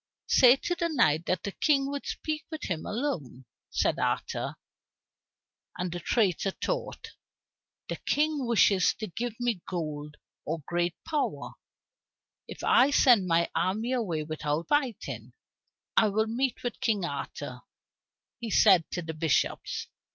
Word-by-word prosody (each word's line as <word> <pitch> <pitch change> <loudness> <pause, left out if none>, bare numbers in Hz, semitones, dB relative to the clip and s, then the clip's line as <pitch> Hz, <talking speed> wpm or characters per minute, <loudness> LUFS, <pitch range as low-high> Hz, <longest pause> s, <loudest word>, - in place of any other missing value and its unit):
"Say 250 -1 +7
to 350 - -2
the 340 -1 -1
knight 170 - +2
that 185 - 0
the 200 - -3
King 275 +4 +2
would 285 0 -5
speak 310 0 -3
with 315 -1 -6
him 165 -4 -3
alone," 175 - -3 0.2
said - - 0
Arthur. - - -1 1.2
And 180 -1 -2
the 175 - -4
traitor 195 0 +1
thought, - - -4 0.8
"The - - -4
King 295 -3 0
wishes 200 -5 +4
to 215 - -5
give 230 +5 -5
me 240 -7 -1
gold 150 -4 -4 0.3
or 160 0 -4
great 175 0 -1
power, 305 -3 -2 1.0
if - - -9
I 260 +3 +5
send 245 -9 +5
my 170 0 +3
army 195 +8 0
away 190 -12 -1
without 150 +1 -3
fighting," 265 -8 -1 0.6
"I 220 - +5
will 215 +2 +1
meet 245 +3 -1 0.2
King 205 -6 +1
Arthur," 140 -4 -5 0.8
he 230 - -5
said 190 -6 +5
to 175 - -2
the 160 0 -5
bishops. 155 -3 0
205 Hz, 135 wpm, -28 LUFS, 170-255 Hz, 1.2 s, Say